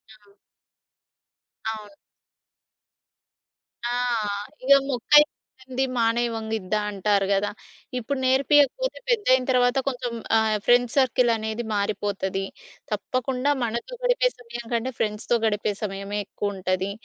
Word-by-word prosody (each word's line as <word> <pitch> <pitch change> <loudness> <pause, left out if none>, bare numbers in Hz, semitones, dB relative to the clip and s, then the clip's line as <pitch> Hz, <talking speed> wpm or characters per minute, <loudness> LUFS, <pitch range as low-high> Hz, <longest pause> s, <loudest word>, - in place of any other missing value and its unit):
ఆ! 210 -1 -25 1.4
అవును. 215 -1 -8 2.0
ఆ! 240 - -1 0.7
ఇగ 270 - +1 0.2
"మొక్కై 275 +3 +6 0.4
వంగనిది 260 0 -2
మానై 230 +1 +2
వంగిద్దా," 220 -2 -2
అంటారు 200 0 +1
కదా! 200 +1 +1 0.5
ఇప్పుడు 260 +4 -3
నేర్పియకపోతే 290 - +3
పెద్దయిన 335 - +3
తరువాత 245 0 +3
కొంచెం 245 -2 -2 0.3
ఆహ్, 220 -1 +2
ఫ్రెండ్స్ 245 0 +3
సర్కిల్ 250 -2 +4
అనేది 220 +2 -3
మారిపోతది. 200 -1 -1 0.5
తప్పకుండా 255 +2 -1
మనతో 235 - -3
గడిపే - - +3
సమయం 240 0 -8
కంటే 235 +3 0
ఫ్రెండ్స్‌తో 215 +2 0
గడిపే 210 -1 0
సమయమే 200 0 -3
ఎక్కువుంటది. 190 -1 -2
235 Hz, 100 wpm, -25 LUFS, 210-255 Hz, 2.0 s, మొక్కై